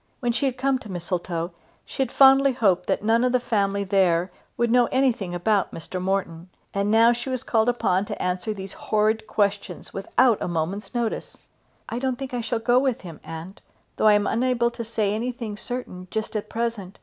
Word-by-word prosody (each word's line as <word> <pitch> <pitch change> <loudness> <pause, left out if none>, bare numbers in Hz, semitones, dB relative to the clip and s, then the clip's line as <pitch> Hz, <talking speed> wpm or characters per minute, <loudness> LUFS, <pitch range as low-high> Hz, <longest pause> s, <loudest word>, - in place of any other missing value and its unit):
When 240 -3 0
she 275 +4 0
had 255 -1 -3
come 265 0 +1
to 215 -5 -10
Mistletoe 175 -1 -3 0.3
she - - -5
had 260 -2 0
fondly 270 0 +6
hoped 190 -7 +2
that - - 0
none 225 +2 +3
of 250 - +2
the 250 - +4
family 200 -4 0
there 185 -2 +2 0.3
would 235 -1 +1
know 245 -1 +5
anything 245 -9 0
about 195 +2 +1
Mr. 180 +3 -6
Morton. 185 -2 -2 0.2
And 200 +1 0
now 230 +2 +6
she 240 +2 -5
was 255 -2 -3
called 225 0 +2
upon 200 -5 +1
to - - -6
answer 180 +4 -1
these 195 -2 -7
horrid 215 +1 0
questions 200 -1 -1
without 215 +4 +2
a - - -1
moment's 180 +6 -3
notice! 235 -2 -2 0.5
"I 235 - -3
don't 260 -1 -1
think 265 -1 -6
I 245 - -1
shall 235 +1 -1
go 240 +2 +3
with 260 -3 0
him, 170 -4 -10
aunt; 165 +4 -8 0.4
though - - +3
I 210 - +7
am 205 0 +3
unable 240 0 +1
to 235 - -6
say 215 -3 -1
anything 230 -1 -3
certain 210 -6 -6
just 220 +2 -4
at 215 0 -3
present. 225 -5 -3
220 Hz, 200 wpm, -24 LUFS, 190-240 Hz, 0.5 s, I